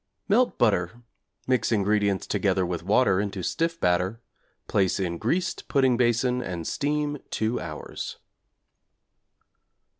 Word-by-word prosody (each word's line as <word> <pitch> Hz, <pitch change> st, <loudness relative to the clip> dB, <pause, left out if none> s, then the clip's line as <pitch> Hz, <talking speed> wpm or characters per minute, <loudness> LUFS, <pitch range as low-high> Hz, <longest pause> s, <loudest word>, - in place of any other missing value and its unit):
Melt 235 Hz, +5 st, +3 dB
butter, 105 Hz, 0 st, +1 dB, 0.4 s
mix 130 Hz, -2 st, +1 dB
ingredients 100 Hz, -2 st, +1 dB
together 95 Hz, -2 st, +1 dB
with 90 Hz, -1 st, -3 dB
water 100 Hz, +1 st, +3 dB
into 100 Hz, -3 st, -4 dB
stiff 165 Hz, -, -1 dB
batter; 90 Hz, +5 st, +1 dB, 0.5 s
place 95 Hz, -1 st, +1 dB
in 85 Hz, -3 st, -2 dB
greased 175 Hz, +11 st, -1 dB
pudding 130 Hz, -3 st, +3 dB
basin 125 Hz, +1 st, +2 dB
and 85 Hz, -8 st, -5 dB
steam 145 Hz, 0 st, -1 dB
2 110 Hz, +3 st, -1 dB
hours. 75 Hz, -3 st, -6 dB
110 Hz, 115 wpm, -26 LUFS, 95-130 Hz, 0.5 s, Melt